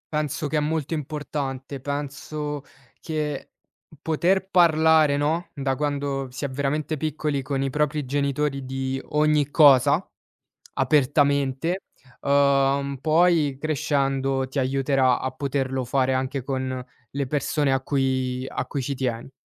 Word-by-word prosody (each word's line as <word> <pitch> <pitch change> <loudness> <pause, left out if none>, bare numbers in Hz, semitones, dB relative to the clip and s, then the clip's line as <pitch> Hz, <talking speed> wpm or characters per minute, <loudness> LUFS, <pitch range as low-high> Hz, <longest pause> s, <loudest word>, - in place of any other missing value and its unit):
Penso 150 0 -1
che 155 - -1
è - - +3
molto 155 +1 -1
importante. 140 -2 -4
Penso 145 +1 -4 0.4
che, 150 -3 -3 0.5
poter 180 +5 +1
parlare, 160 -5 +4
no, 160 +4 0
da 135 -1 -1
quando 140 -1 -2
si 130 +3 -5
è - - -2
veramente 145 +3 -2
piccoli 150 -1 -2
con 135 0 -2
i 135 - -1
propri 150 0 0
genitori 140 0 -1
di 135 0 -3
ogni 150 -1 +2
cosa, 145 +2 +5 0.7
apertamente, 140 +4 +1 0.4
uhm, 140 0 +2
poi 160 -4 +3
crescendo 135 -3 0
ti 140 - -5
aiuterà 135 -1 +2
a 130 - -2
poterlo 135 -1 -2
fare 130 +1 +1
anche 130 +1 -2
con 130 -1 -3 0.3
le 140 0 -2
persone 145 +1 0
a 135 - +1
cui 130 -2 -1
a - - -3
cui 140 - -4
ci 140 +2 -2
tieni. 125 -1 -3
140 Hz, 130 wpm, -24 LUFS, 135-150 Hz, 0.7 s, cosa